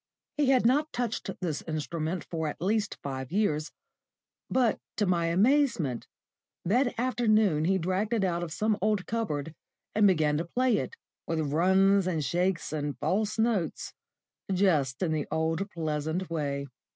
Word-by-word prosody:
He 295 Hz, -2 st, +2 dB
had 255 Hz, -3 st, +4 dB
not 290 Hz, +6 st, +3 dB
touched 240 Hz, -4 st, -3 dB
this 165 Hz, -5 st, -2 dB
instrument 160 Hz, +2 st, -3 dB
for 160 Hz, -2 st, -3 dB
at 150 Hz, -, -5 dB
least 205 Hz, +3 st, 0 dB
five 130 Hz, -2 st, -5 dB
years, 165 Hz, -6 st, 0 dB, 0.8 s
but 245 Hz, -4 st, +2 dB, 0.2 s
to 210 Hz, -, +2 dB
my 170 Hz, -3 st, +1 dB
amazement, 205 Hz, -, +2 dB, 0.6 s
that 245 Hz, +7 st, +1 dB
afternoon 215 Hz, -10 st, +2 dB
he 190 Hz, +2 st, +3 dB
dragged 185 Hz, +5 st, -1 dB
it 225 Hz, -4 st, +1 dB
out 175 Hz, -2 st, 0 dB
of 170 Hz, -2 st, -4 dB
some 215 Hz, +5 st, 0 dB
old 210 Hz, -3 st, +1 dB
cupboard 160 Hz, -10 st, -2 dB, 0.4 s
and 210 Hz, -1 st, +5 dB
began 155 Hz, -5 st, +2 dB
to 165 Hz, -, -2 dB
play 245 Hz, +5 st, +1 dB
it, 465 Hz, -, -4 dB, 0.3 s
with 160 Hz, -3 st, -1 dB
runs 190 Hz, +3 st, +4 dB
and 160 Hz, -5 st, -1 dB
shakes 180 Hz, 0 st, 0 dB
and 145 Hz, -2 st, -3 dB
false 210 Hz, +3 st, 0 dB
notes, 220 Hz, -8 st, 0 dB, 0.6 s
just 160 Hz, -8 st, +2 dB
in 170 Hz, -, 0 dB
the 155 Hz, -2 st, -1 dB
old 165 Hz, +5 st, -1 dB
pleasant 160 Hz, +2 st, -3 dB
way. 140 Hz, -3 st, -2 dB
180 Hz, 150 wpm, -28 LUFS, 155-215 Hz, 0.8 s, and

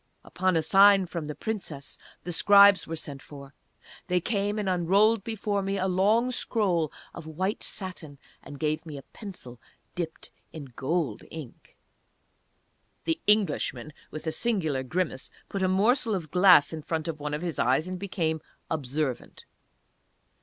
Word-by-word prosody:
Upon 185 Hz, 0 st, 0 dB
a 160 Hz, -, +1 dB
sign 195 Hz, +2 st, +6 dB
from 170 Hz, -3 st, -5 dB
the 150 Hz, 0 st, -5 dB
Princess 185 Hz, -11 st, -5 dB, 0.2 s
the 175 Hz, -, -4 dB
Scribes 200 Hz, 0 st, +6 dB
were 165 Hz, -, -4 dB
sent 145 Hz, -3 st, -7 dB
for. 140 Hz, -1 st, -12 dB, 0.5 s
They 180 Hz, -1 st, +2 dB
came 205 Hz, +2 st, -1 dB
and 210 Hz, -2 st, -2 dB
unrolled 195 Hz, +4 st, +3 dB
before 210 Hz, -2 st, -2 dB
me 195 Hz, +1 st, -2 dB
a 190 Hz, 0 st, 0 dB
long 210 Hz, +7 st, +2 dB
scroll 180 Hz, -, 0 dB, 0.2 s
of 165 Hz, -2 st, -9 dB
white 185 Hz, +6 st, -2 dB
satin, 175 Hz, -7 st, -7 dB, 0.2 s
and 145 Hz, -, -10 dB
gave 155 Hz, 0 st, -1 dB
me 155 Hz, -4 st, -8 dB
a 135 Hz, -, -9 dB
pencil 130 Hz, -, -10 dB, 0.3 s
dipped 165 Hz, -3 st, -5 dB, 0.2 s
in 155 Hz, -3 st, -8 dB
gold 145 Hz, -5 st, -1 dB
ink. 155 Hz, -7 st, -11 dB, 1.3 s
The 325 Hz, -1 st, -1 dB
Englishman, 205 Hz, -7 st, +1 dB, 0.2 s
with 155 Hz, -, -8 dB
a 160 Hz, -, 0 dB
singular 160 Hz, -, 0 dB
grimace, 140 Hz, 0 st, -3 dB, 0.2 s
put 195 Hz, -, -3 dB
a 185 Hz, -, +3 dB
morsel 220 Hz, +4 st, +2 dB
of 165 Hz, -5 st, -5 dB
glass 180 Hz, -5 st, +6 dB
in 160 Hz, -, -5 dB
front 160 Hz, +1 st, -3 dB
of 160 Hz, -2 st, -4 dB
one 150 Hz, 0 st, -3 dB
of 150 Hz, -, -5 dB
his 170 Hz, -3 st, -3 dB
eyes, 130 Hz, +7 st, +2 dB
and 185 Hz, 0 st, -5 dB
became 165 Hz, -5 st, -2 dB, 0.3 s
observant. 145 Hz, -3 st, -3 dB
175 Hz, 155 wpm, -27 LUFS, 155-200 Hz, 1.3 s, sign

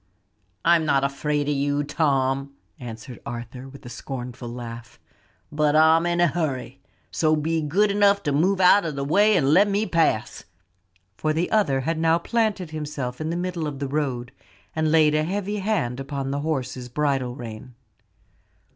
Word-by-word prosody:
"I'm 170 Hz, -1 st, +5 dB
not 140 Hz, -3 st, +2 dB
afraid 145 Hz, +1 st, -1 dB
of 150 Hz, -, +1 dB
you, 145 Hz, +1 st, 0 dB
Tom," 140 Hz, -2 st, 0 dB, 0.2 s
answered 120 Hz, 0 st, -9 dB
Arthur, 120 Hz, +2 st, -7 dB
with 140 Hz, -1 st, -14 dB
a -, -, -7 dB
scornful 125 Hz, 0 st, -7 dB
laugh, 120 Hz, 0 st, -8 dB, 0.5 s
"but 150 Hz, 0 st, +1 dB
I'm 160 Hz, +2 st, +5 dB
in 175 Hz, 0 st, 0 dB
a 175 Hz, -, +5 dB
hurry; 140 Hz, -5 st, -3 dB, 0.3 s
so 155 Hz, -1 st, +2 dB
be 160 Hz, +2 st, -1 dB
good 200 Hz, +8 st, +2 dB
enough 200 Hz, 0 st, +3 dB
to 145 Hz, -, 0 dB
move 180 Hz, +7 st, +2 dB
out 190 Hz, +2 st, +6 dB
of 160 Hz, -4 st, -3 dB
the 140 Hz, -, -2 dB
way 205 Hz, +7 st, +4 dB
and 145 Hz, -3 st, +3 dB
let 200 Hz, +5 st, +6 dB
me 205 Hz, +2 st, +1 dB
pass." 165 Hz, -, 0 dB, 0.7 s
For 155 Hz, 0 st, 0 dB
the 165 Hz, +3 st, -1 dB
other 145 Hz, -12 st, +2 dB
had 160 Hz, +4 st, -2 dB
now 165 Hz, 0 st, +3 dB
planted 205 Hz, -3 st, -1 dB
himself 150 Hz, -4 st, -5 dB
in 155 Hz, -, -2 dB
the 170 Hz, -, -2 dB
middle 175 Hz, -3 st, -3 dB
of 145 Hz, -2 st, -5 dB
the 140 Hz, 0 st, -3 dB
road, 135 Hz, -4 st, -2 dB, 0.4 s
and 155 Hz, -1 st, +1 dB
laid 155 Hz, -2 st, +5 dB
a 155 Hz, 0 st, +2 dB
heavy 200 Hz, +4 st, -2 dB
hand 190 Hz, -, -1 dB
upon 135 Hz, 0 st, -4 dB
the 140 Hz, -, -2 dB
horse's 130 Hz, -4 st, -3 dB
bridle 135 Hz, -2 st, -1 dB
rein. 120 Hz, 0 st, -9 dB
150 Hz, 175 wpm, -24 LUFS, 135-165 Hz, 0.7 s, out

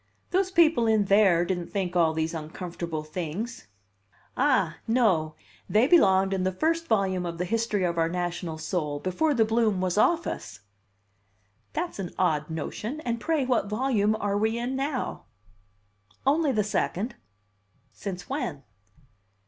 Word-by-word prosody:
"Those 375 Hz, +1 st, +2 dB
people 320 Hz, -10 st, +4 dB
in 215 Hz, -2 st, +3 dB
there 195 Hz, -4 st, +4 dB
didn't 175 Hz, -1 st, -2 dB
think 185 Hz, -3 st, -2 dB
all 165 Hz, -2 st, +4 dB
these 160 Hz, +1 st, -2 dB
uncomfortable 165 Hz, 0 st, -5 dB
things." 180 Hz, +9 st, -5 dB, 0.7 s
"Ah! 255 Hz, -, +2 dB
no! 190 Hz, -10 st, +2 dB, 0.3 s
They 215 Hz, +4 st, +4 dB
belonged 195 Hz, -, +5 dB
in 190 Hz, -, 0 dB
the 185 Hz, 0 st, +1 dB
first 330 Hz, -, 0 dB
volume 190 Hz, -4 st, +1 dB
of 170 Hz, -1 st, -4 dB
the 180 Hz, -, -1 dB
history 225 Hz, -1 st, 0 dB
of 170 Hz, -1 st, 0 dB
our 165 Hz, 0 st, +2 dB
national 175 Hz, -2 st, -3 dB
soul, 155 Hz, -2 st, -2 dB
before 280 Hz, -, 0 dB
the 225 Hz, -2 st, +4 dB
bloom 220 Hz, -3 st, +1 dB
was 185 Hz, +2 st, 0 dB
off 340 Hz, +8 st, +3 dB
us." 95 Hz, -, -6 dB, 1.1 s
"That's 350 Hz, -, -3 dB
an 180 Hz, -3 st, -5 dB
odd 155 Hz, -4 st, +1 dB
notion! 210 Hz, -, -4 dB
And 235 Hz, -4 st, -3 dB
pray 315 Hz, -4 st, +1 dB
what 245 Hz, -5 st, +1 dB
volume 215 Hz, -2 st, +1 dB
are 205 Hz, -2 st, -1 dB
we 220 Hz, +2 st, +1 dB
in 245 Hz, +3 st, -2 dB
now?" 270 Hz, -1 st, -3 dB, 1.0 s
"Only 295 Hz, +1 st, +3 dB
the 215 Hz, -4 st, +1 dB
second." 210 Hz, +2 st, -1 dB, 0.8 s
"Since 185 Hz, -3 st, -6 dB
when?" 180 Hz, -, -3 dB
200 Hz, 150 wpm, -27 LUFS, 175-240 Hz, 1.1 s, belonged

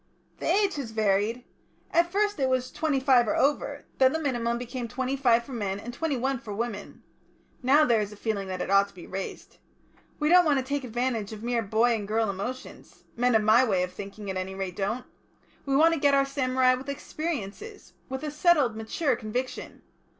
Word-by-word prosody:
"The -, -, -3 dB
age 400 Hz, -4 st, +2 dB
has 270 Hz, -5 st, -4 dB
varied. 220 Hz, +2 st, 0 dB, 0.5 s
At 340 Hz, +1 st, +3 dB
first 410 Hz, -1 st, 0 dB
it 265 Hz, -1 st, +2 dB
was 255 Hz, -1 st, 0 dB
twenty 305 Hz, -4 st, 0 dB
five 260 Hz, -3 st, +4 dB
or -, -, +1 dB
over; 285 Hz, 0 st, 0 dB
then 260 Hz, 0 st, +5 dB
the 320 Hz, -, 0 dB
minimum 240 Hz, -5 st, -1 dB
became 245 Hz, 0 st, -5 dB
twenty 260 Hz, +3 st, -2 dB
five 240 Hz, -4 st, +3 dB
for 270 Hz, -, -12 dB
men 200 Hz, -4 st, -2 dB
and 240 Hz, +4 st, -7 dB
twenty 300 Hz, 0 st, -1 dB
one 265 Hz, +1 st, -1 dB
for 210 Hz, -3 st, -7 dB
women. 220 Hz, -2 st, -5 dB, 0.6 s
Now 280 Hz, +4 st, +5 dB
there 230 Hz, -4 st, +3 dB
is 205 Hz, 0 st, -4 dB
a -, -, -10 dB
feeling 205 Hz, -2 st, -3 dB
that 185 Hz, -1 st, -3 dB
it -, -, -4 dB
ought 200 Hz, 0 st, +5 dB
to 200 Hz, -, -21 dB
be 175 Hz, -, -10 dB
raised. 190 Hz, 0 st, -7 dB, 0.6 s
We 300 Hz, -, 0 dB
don't 355 Hz, +2 st, +7 dB
want 300 Hz, -4 st, +2 dB
to 260 Hz, -, -1 dB
take 280 Hz, +1 st, -2 dB
advantage 235 Hz, -3 st, -2 dB
of 215 Hz, 0 st, -9 dB
mere 240 Hz, 0 st, 0 dB
boy 225 Hz, +3 st, +2 dB
and 210 Hz, -3 st, -3 dB
girl 220 Hz, -1 st, +1 dB
emotions 245 Hz, +7 st, -7 dB
men 245 Hz, 0 st, +2 dB
of 220 Hz, -, +4 dB
my 220 Hz, +4 st, +6 dB
way 195 Hz, -7 st, +1 dB
of 180 Hz, -, -5 dB
thinking, 200 Hz, 0 st, -7 dB
at 190 Hz, -, -4 dB
any 185 Hz, +1 st, -4 dB
rate, 190 Hz, -2 st, -4 dB
don't 210 Hz, +5 st, -2 dB, 0.6 s
we 270 Hz, -, +1 dB
want 325 Hz, +3 st, +5 dB
to 330 Hz, -, -1 dB
get 280 Hz, 0 st, +4 dB
our 275 Hz, 0 st, +3 dB
samurai 260 Hz, -2 st, +2 dB
with 260 Hz, +2 st, -5 dB
experiences, 310 Hz, -, -5 dB, 0.2 s
with 265 Hz, +2 st, -5 dB
a 300 Hz, -, -3 dB
settled 300 Hz, -7 st, +3 dB
mature 245 Hz, +5 st, -1 dB
conviction. 245 Hz, +3 st, -5 dB
245 Hz, 210 wpm, -27 LUFS, 215-275 Hz, 0.6 s, don't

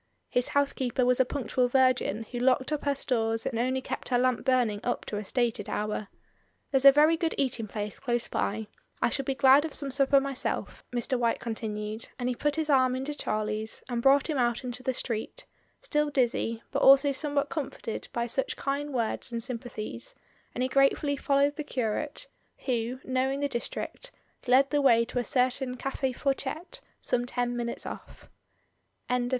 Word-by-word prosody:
His 245 Hz, 0 st, +1 dB
housekeeper 265 Hz, -3 st, 0 dB
was 250 Hz, 0 st, +3 dB
a 260 Hz, -, +5 dB
punctual 250 Hz, -1 st, 0 dB
virgin 250 Hz, -4 st, +2 dB
who 245 Hz, -, -3 dB
locked 260 Hz, +2 st, +2 dB
up 300 Hz, -1 st, -2 dB
her 285 Hz, -1 st, +2 dB
stores 225 Hz, -4 st, 0 dB
and 230 Hz, -, -2 dB
only 260 Hz, +2 st, 0 dB
kept -, -, -5 dB
her 245 Hz, -, +3 dB
lamp 255 Hz, -1 st, +1 dB
burning 245 Hz, -6 st, +2 dB
up 245 Hz, -, -2 dB
to 210 Hz, -, -4 dB
a 210 Hz, -, -3 dB
stated 230 Hz, -1 st, -1 dB
hour. 210 Hz, 0 st, -2 dB, 0.6 s
"There's 270 Hz, -1 st, +2 dB
a 275 Hz, -, +12 dB
very 300 Hz, +3 st, +5 dB
good 325 Hz, 0 st, -1 dB
eating 240 Hz, -5 st, -1 dB
place 210 Hz, -1 st, -5 dB
close 240 Hz, -2 st, 0 dB
by. 215 Hz, +2 st, -2 dB, 0.3 s
I -, -, +2 dB
shall 275 Hz, -, -2 dB
be 270 Hz, -, -1 dB
glad 270 Hz, +2 st, +6 dB
of 320 Hz, -3 st, -3 dB
some 280 Hz, -2 st, +1 dB
supper 275 Hz, +1 st, +4 dB
myself," 275 Hz, -1 st, -3 dB
Mr. 245 Hz, +1 st, 0 dB
White 235 Hz, -1 st, +1 dB
con 230 Hz, -, -3 dB
tinued, 215 Hz, 0 st, -5 dB
and 245 Hz, -, -2 dB
he 250 Hz, -, +1 dB
put 295 Hz, +3 st, 0 dB
his 320 Hz, -1 st, -1 dB
arm 260 Hz, -3 st, +4 dB
into 270 Hz, +3 st, -3 dB
Charlie's 215 Hz, -4 st, -3 dB
and 240 Hz, -1 st, -1 dB
brought 275 Hz, +2 st, +5 dB
him 300 Hz, -5 st, -1 dB
out 240 Hz, 0 st, +1 dB
into 250 Hz, 0 st, -5 dB
the 260 Hz, -, 0 dB
street, 240 Hz, -, -4 dB, 0.4 s
still 300 Hz, -1 st, +1 dB
dizzy, 235 Hz, -4 st, 0 dB
but 275 Hz, -, -1 dB
also 275 Hz, +1 st, +7 dB
somewhat 285 Hz, +1 st, -1 dB
comforted 270 Hz, -7 st, -5 dB
by 235 Hz, 0 st, -1 dB
such 255 Hz, +3 st, -2 dB
kind 285 Hz, +1 st, -2 dB
words 240 Hz, -1 st, -2 dB
and 230 Hz, -1 st, -3 dB
sym 245 Hz, -1 st, -4 dB
pathies; 245 Hz, -, -7 dB, 0.4 s
and 250 Hz, -, 0 dB
he -, -, +2 dB
gratefully 275 Hz, +2 st, +2 dB
followed 280 Hz, +1 st, +1 dB
the 300 Hz, -, -3 dB
curate, 275 Hz, -, -2 dB, 0.4 s
who, 245 Hz, 0 st, -1 dB
knowing 260 Hz, +1 st, 0 dB
the 285 Hz, -, +1 dB
district, 280 Hz, -, -5 dB, 0.4 s
led 265 Hz, +2 st, +5 dB
the 290 Hz, -1 st, +2 dB
way 235 Hz, -4 st, +5 dB
to 245 Hz, -, -3 dB
a -, -, 0 dB
certain 255 Hz, 0 st, 0 dB
Cafl 270 Hz, 0 st, -2 dB
Fourchette 280 Hz, +5 st, -3 dB, 0.2 s
some 245 Hz, 0 st, -1 dB
ten 245 Hz, -1 st, -1 dB
minutes 235 Hz, -1 st, -3 dB
off. -, -, -9 dB
255 Hz, 185 wpm, -28 LUFS, 235-275 Hz, 0.6 s, a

